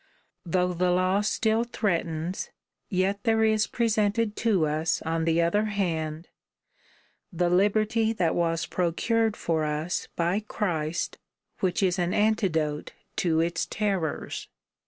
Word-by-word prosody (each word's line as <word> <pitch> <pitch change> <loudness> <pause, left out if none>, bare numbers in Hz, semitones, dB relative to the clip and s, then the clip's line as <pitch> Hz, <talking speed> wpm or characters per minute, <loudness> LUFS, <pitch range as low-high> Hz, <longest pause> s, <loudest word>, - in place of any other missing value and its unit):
Though 180 +1 +1
the 180 +1 +1
law 185 +2 +2
still 220 +2 +1
threatens, 170 -6 -2 0.4
yet 195 +2 0
there 225 0 +3
is 215 -1 +3
presented 220 -1 +1
to 205 -8 +2
us 155 +1 0
on 160 0 -1
the 165 +1 +3
other 205 +6 +2
hand, 165 -6 -2 1.0
the 175 0 0
liberty 215 +4 +2
that 175 -7 +1
was 165 -1 0
procured 215 +7 0
for 160 -2 0
us 150 +3 -2
by 175 +4 +1
Christ, 175 -6 -2 0.4
which 185 +1 0
is 185 0 +2
an 175 0 0
antidote 170 -9 +1 0.2
to 165 -2 +2
its 170 0 -1
terrors. 195 -7 -2
180 Hz, 125 wpm, -27 LUFS, 165-210 Hz, 1.0 s, there